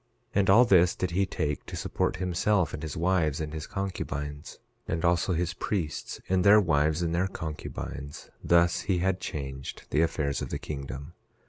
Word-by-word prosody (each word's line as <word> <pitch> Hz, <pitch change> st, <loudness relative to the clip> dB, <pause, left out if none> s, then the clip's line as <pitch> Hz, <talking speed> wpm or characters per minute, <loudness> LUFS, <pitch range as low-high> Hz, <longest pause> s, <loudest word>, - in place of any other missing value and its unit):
11:4 -, -, +2 dB
And 95 Hz, -, +2 dB
all 115 Hz, +6 st, +8 dB
this 90 Hz, -5 st, +5 dB
did 90 Hz, -2 st, -2 dB
he 95 Hz, +2 st, +1 dB
take 75 Hz, -6 st, -2 dB
to -, -, -6 dB
support -, -, -1 dB
himself, 90 Hz, 0 st, +1 dB
and 75 Hz, -, -5 dB
his 80 Hz, +2 st, -5 dB
wives 85 Hz, -4 st, +1 dB
and 75 Hz, -1 st, -4 dB
his 80 Hz, -1 st, -5 dB
concubines; 75 Hz, -7 st, -4 dB, 0.3 s
and 80 Hz, +1 st, -1 dB
also 85 Hz, +2 st, +2 dB
his 85 Hz, +1 st, -1 dB
priests, 85 Hz, -4 st, -3 dB
and 95 Hz, -1 st, +2 dB
their 105 Hz, +2 st, +8 dB
wives 80 Hz, -2 st, +2 dB
and 85 Hz, -1 st, -1 dB
their 90 Hz, +3 st, +1 dB
concubines; 75 Hz, -4 st, -6 dB
thus 85 Hz, 0 st, +4 dB
he 95 Hz, -, +3 dB
had 95 Hz, +1 st, +1 dB
changed 65 Hz, -5 st, -5 dB
the 75 Hz, -, +3 dB
affairs 75 Hz, -3 st, 0 dB
of -, -, -4 dB
the -, -, -2 dB
kingdom. 70 Hz, -1 st, -6 dB
85 Hz, 185 wpm, -28 LUFS, 75-95 Hz, 0.3 s, all